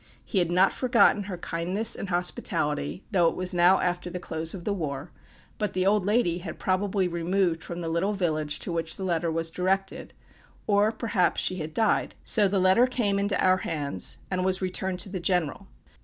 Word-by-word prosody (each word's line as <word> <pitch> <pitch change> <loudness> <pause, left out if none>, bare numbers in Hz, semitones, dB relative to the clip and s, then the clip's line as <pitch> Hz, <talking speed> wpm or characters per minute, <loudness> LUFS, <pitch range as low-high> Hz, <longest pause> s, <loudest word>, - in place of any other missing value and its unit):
He 195 - 0
had 175 -2 +1
not 185 +2 +3
forgotten 235 -5 +3
her 185 -3 -5
kindness 180 +6 0
and 195 - -6
hospitality, 150 -3 -1
though 175 -5 +4
it - - 0
was 185 0 0
now 180 +2 +5
after 175 0 -2
the 180 - -5
close 160 0 -3
of 180 - -8
the 205 - -1
war; 150 -4 -5 0.5
but 210 -1 -1
the 185 0 0
old 200 -1 +2
lady 205 -6 +1
had 170 -2 -7
probably 190 0 0
removed 170 0 0
from 175 0 -6
the 165 - -4
little 170 +5 0
village 155 -6 0
to - - -3
which 165 -1 -1
the 190 - -7
letter 170 -2 0
was 165 0 -2
directed, 190 +2 -2 0.5
or, 205 +1 +3
perhaps, 220 -5 0
she 185 - +2
had 155 -2 -6
died: 220 -2 +1
so 210 -2 +4
the 195 +1 0
letter 190 +7 +4
came 215 -6 0
into 200 -1 0
our 185 0 +4
hands, 145 - -2
and 185 -1 0
was 185 0 +1
returned 185 0 -2
to 195 - -3
the 190 -1 -4
general. 180 +1 -1
185 Hz, 200 wpm, -26 LUFS, 170-195 Hz, 0.5 s, now